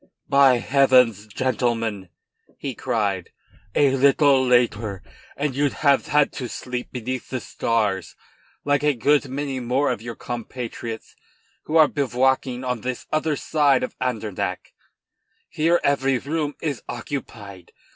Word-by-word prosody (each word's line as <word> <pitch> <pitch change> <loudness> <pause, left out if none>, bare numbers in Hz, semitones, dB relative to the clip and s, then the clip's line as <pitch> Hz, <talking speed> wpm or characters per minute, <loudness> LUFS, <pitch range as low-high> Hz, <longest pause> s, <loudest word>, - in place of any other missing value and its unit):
"By 140 -2 +5
heavens! 125 -5 +3
gentlemen," 115 -4 -1 0.5
he 135 - -4
cried, 105 -8 -2 0.5
"a 140 -2 +4
little 140 0 +4
later 115 -5 +1 0.3
and 140 -2 -1
you'd 145 0 +1
have 140 -1 +4
had 150 -1 +3
to 125 -3 -5
sleep 125 -1 -5
beneath 125 +1 -5
the 130 - -2
stars, 105 -7 -1 0.5
like 145 -1 +2
a 150 -1 +2
good 140 +3 +2
many 135 0 -3
more 130 +4 +1
of - - -4
your 120 0 -6
compatriots 120 -1 -6 0.5
who 155 - +1
are 155 -1 +7
bivouacking 130 -2 0
on 125 -3 -2
the 125 +1 -3
other 155 0 +1
side 140 -2 +2
of 125 - -4
Andernach. 110 -6 -3 0.7
Here 165 +3 +2
every 135 -2 +2
room 145 +2 -3
is 145 -6 -2
occupied. 110 - -7
130 Hz, 130 wpm, -23 LUFS, 115-140 Hz, 0.7 s, are